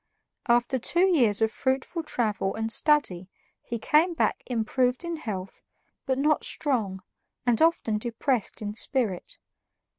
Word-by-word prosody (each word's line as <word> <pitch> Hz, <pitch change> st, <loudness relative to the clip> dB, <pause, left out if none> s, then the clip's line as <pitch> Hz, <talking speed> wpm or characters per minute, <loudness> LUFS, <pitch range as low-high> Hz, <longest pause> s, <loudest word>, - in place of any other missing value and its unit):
After 240 Hz, +2 st, +2 dB
two 345 Hz, +9 st, +3 dB
years 225 Hz, -6 st, +3 dB
of 220 Hz, -, +1 dB
fruitful 265 Hz, +7 st, -2 dB
travel 215 Hz, -9 st, -2 dB
and 225 Hz, 0 st, -3 dB
study 225 Hz, -, +2 dB, 0.3 s
he 235 Hz, -, -5 dB
came 315 Hz, +9 st, +2 dB
back -, -, 0 dB
improved 250 Hz, +3 st, 0 dB
in 340 Hz, -1 st, -4 dB
health 195 Hz, -9 st, -6 dB, 0.5 s
but 260 Hz, -1 st, +1 dB
not 300 Hz, +2 st, +2 dB
strong, 215 Hz, -10 st, -1 dB, 0.4 s
and 240 Hz, -2 st, +2 dB
often 320 Hz, -10 st, +2 dB
depressed 235 Hz, 0 st, -2 dB
in 205 Hz, 0 st, -4 dB
spirit. 225 Hz, -5 st, -2 dB
240 Hz, 130 wpm, -26 LUFS, 215-285 Hz, 0.5 s, two